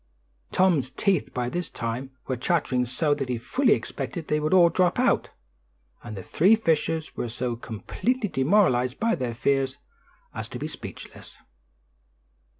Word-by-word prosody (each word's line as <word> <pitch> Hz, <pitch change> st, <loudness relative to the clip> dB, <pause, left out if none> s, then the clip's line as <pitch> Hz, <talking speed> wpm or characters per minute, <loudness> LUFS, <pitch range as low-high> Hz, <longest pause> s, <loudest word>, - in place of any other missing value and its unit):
Tom's 170 Hz, -9 st, +3 dB
teeth 185 Hz, +5 st, 0 dB
by 125 Hz, -1 st, -2 dB
this 175 Hz, +6 st, -3 dB
time 115 Hz, +3 st, -4 dB, 0.2 s
were 130 Hz, -, -1 dB
chattering 125 Hz, -2 st, 0 dB
so 145 Hz, +5 st, +1 dB
that 135 Hz, -3 st, -3 dB
he 125 Hz, -, 0 dB
fully 255 Hz, -, +2 dB
expected 170 Hz, -4 st, -4 dB
they 150 Hz, -, +2 dB
would 150 Hz, 0 st, -1 dB
all 180 Hz, -2 st, +7 dB
drop 180 Hz, +1 st, +2 dB
out, -, -, +2 dB, 0.7 s
and 110 Hz, -3 st, -7 dB
the 95 Hz, -, -6 dB
three 190 Hz, -, +4 dB
fishers 160 Hz, -5 st, 0 dB
were 120 Hz, -, -3 dB
so 120 Hz, +1 st, -2 dB
completely 210 Hz, -, -2 dB
demoralized 130 Hz, -6 st, +2 dB
by 230 Hz, +1 st, +2 dB
their 120 Hz, -3 st, -2 dB
fears 135 Hz, +1 st, +1 dB, 0.6 s
as -, -, -5 dB
to -, -, -6 dB
be -, -, -4 dB
speechless. -, -, -10 dB
140 Hz, 150 wpm, -26 LUFS, 125-175 Hz, 0.7 s, all